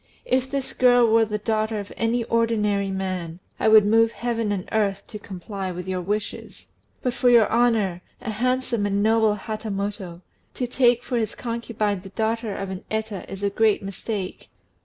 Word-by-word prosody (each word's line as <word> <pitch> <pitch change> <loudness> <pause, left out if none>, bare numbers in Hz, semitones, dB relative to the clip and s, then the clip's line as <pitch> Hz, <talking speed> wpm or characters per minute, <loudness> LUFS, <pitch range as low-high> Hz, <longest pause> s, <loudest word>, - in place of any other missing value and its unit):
If 260 +1 +1
this 270 -1 -3
girl 245 -1 +5
were 225 0 +4
the 210 -1 -2
daughter 215 0 -1
of 200 - -8
any 230 +1 0
ordinary 210 -4 +1
man, 185 -3 -3 0.2
I - - +2
would 215 -1 +7
move 225 +2 +4
heaven 230 -3 -1
and 190 -3 -3
earth 200 -2 0
to 210 - -7
comply 195 0 -6
with 180 +1 -6
your 185 -1 -2
wishes; 205 +3 -4 0.4
but 250 - 0
for 245 - +3
your 235 -3 +6
honour, 220 -7 +2 0.2
a 225 - -4
handsome 245 -1 0
and 200 0 0
noble 220 -1 +3
Hatamoto, 200 -4 -4 0.3
to 250 - -1
take 245 -1 +3
for 245 - -2
his 220 -2 -2
concubine 230 -4 -2
the 195 - -10
daughter 220 +1 -2
of 195 -1 -4
an 190 +2 -6
Eta 220 -3 -4
is 195 +1 -7
a 200 - +1
great 215 -1 +2
mistake. 195 0 -5
215 Hz, 180 wpm, -24 LUFS, 195-230 Hz, 0.4 s, would